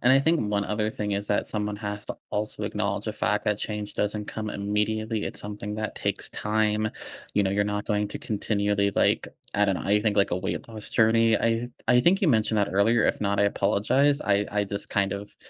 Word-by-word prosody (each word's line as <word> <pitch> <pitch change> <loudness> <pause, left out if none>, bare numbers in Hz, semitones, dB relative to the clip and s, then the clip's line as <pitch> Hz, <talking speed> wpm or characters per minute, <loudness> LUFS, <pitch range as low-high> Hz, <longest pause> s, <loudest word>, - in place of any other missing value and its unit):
and 125 +2 +5
I 135 - +6
think 160 +3 +2
1 100 -1 0
other 105 +2 -1
thing 105 -2 -3
is 100 +1 -2
that 105 - 0
someone 105 -1 -2
has 105 0 -5
to - - -4 0.2
also 105 0 -3
acknowledge 105 0 -2
the 110 - -1
fact 105 -1 0
that 105 -1 +1
change 105 -1 -4
doesn't 105 0 -1
come 110 -1 -4
immediately, 105 +2 -1
it's - - -5
something 105 0 -5
that 110 0 -4
takes - - -2
time. 110 0 0 0.4
You 105 - +3
know, 95 - +1
you're 100 +1 +1
not 105 0 -2
going 105 -1 0
to - - -6
continually, 100 -1 0
like - - +2 0.3
I 105 - +4
don't 100 -2 +2
know, - - -5
I 105 +1 +3
think, 105 -1 0
like, 100 -3 +3
a 90 - +2
weight 95 - -3
loss 110 -2 -9
journey. 115 0 +4
I 115 - +2
th 115 +2 -2 0.2
I 125 - +5
think 180 - +3
you 195 - +2
mentioned 110 -4 +2
that 100 - +2
earlier, 110 +4 +3
if - - 0
not, 100 -1 0
I - - +5
apologize. 130 +9 +2
I 100 0 +1
I 105 0 +1
just 100 0 -5
kind 100 -1 +1
of 100 +1 -7
105 Hz, 230 wpm, -26 LUFS, 100-110 Hz, 0.4 s, I